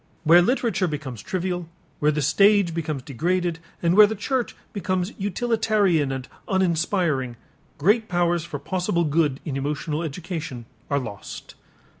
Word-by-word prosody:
Where 170 +2 +7
literature 200 -3 +1
becomes 140 -8 -5
trivial, 180 -2 -3 0.3
where 150 - +3
the 150 -1 -1
stage 200 +2 +4
becomes 155 -5 -3
degraded, 170 +5 -1 0.2
and 170 +1 +3
where 210 0 +9
the 220 - -3
church 250 +4 -2 0.2
becomes 185 -1 -1
utilitarian 205 - +1
and 130 -1 -4 0.2
uninspiring, 170 - +1 0.4
great 210 +9 +3
powers 175 -1 +1
for 150 - -5
possible 175 +3 -1
good 150 -3 +1
in 145 -5 -3
emotional 150 +2 -2
education 160 -6 -5 0.2
are 140 - +1
lost. 110 -7 -7
170 Hz, 135 wpm, -24 LUFS, 150-190 Hz, 0.4 s, where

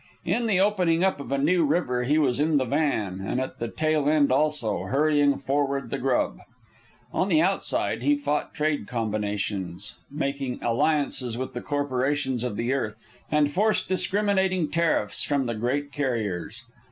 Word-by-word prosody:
In 235 -1 0
the 195 -4 +2
opening 185 -4 +2
up 190 -5 +1
of 135 -2 -7
a 140 - +1
new 165 +5 +3
river 140 -6 0
he 150 +4 +2
was 135 -4 +2
in 155 0 +3
the 130 - +1
van; 120 -9 0
and 120 - -1
at 130 0 -4
the 115 - -2
tail 155 +3 +1
end 150 -3 +3
also, 135 -6 +1
hurrying 145 0 +2
forward 135 -2 -1
the - - -2
grub. 130 -1 0 0.7
On 190 - +1
the 160 -4 +4
Outside 190 +4 +1
he 290 - +3
fought 150 - -1
trade 150 -7 -1
combinations; 105 -4 -3
made 140 -3 -3
alliances 125 -1 +1
with 130 +1 -4
the 120 - -4
corporations 140 -2 -1
of 125 -4 -2
the 120 +3 0
earth, 110 -6 -2 0.3
and 150 -1 +2
forced 215 +6 +1
discriminating 190 -3 +1
tariffs 165 -11 0
from 140 -2 0
the 120 -2 -2
great 135 +6 -2
carriers. 115 - -3
140 Hz, 165 wpm, -26 LUFS, 120-155 Hz, 0.7 s, the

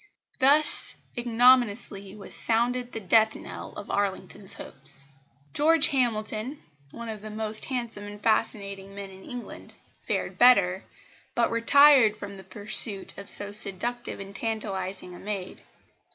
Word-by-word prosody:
Thus 290 +3 +5 0.2
ignominiously 235 -4 +2
was 205 - -6
sounded 245 +2 +1
the 225 - -6
death 220 +2 +2
knell - - -10
of - - -9
Arlington's 195 0 -2
hopes!" 140 0 -8 0.5
George 320 +1 +4
Hamilton, 235 0 -2 0.3
one 235 +10 -9
of 215 -2 -7
the 215 - -9
most 215 0 -3
handsome 235 -5 -4
and 205 0 -10
fascinating 200 -3 -2
men 200 -1 -8
in 190 0 -14
England, 245 -1 -10 0.3
fared - - -4
better, 200 -7 +4 0.5
but 235 - +1
retired 230 -1 +5
from 200 -1 -9
the 190 - -12
pursuit 205 +1 +1
of 200 - -11
so 205 0 -5
seductive 215 +5 +1
and 195 0 -10
tantalising 195 -5 -4
a 175 - -12
maid. 195 -2 -7
215 Hz, 135 wpm, -26 LUFS, 200-240 Hz, 0.5 s, Thus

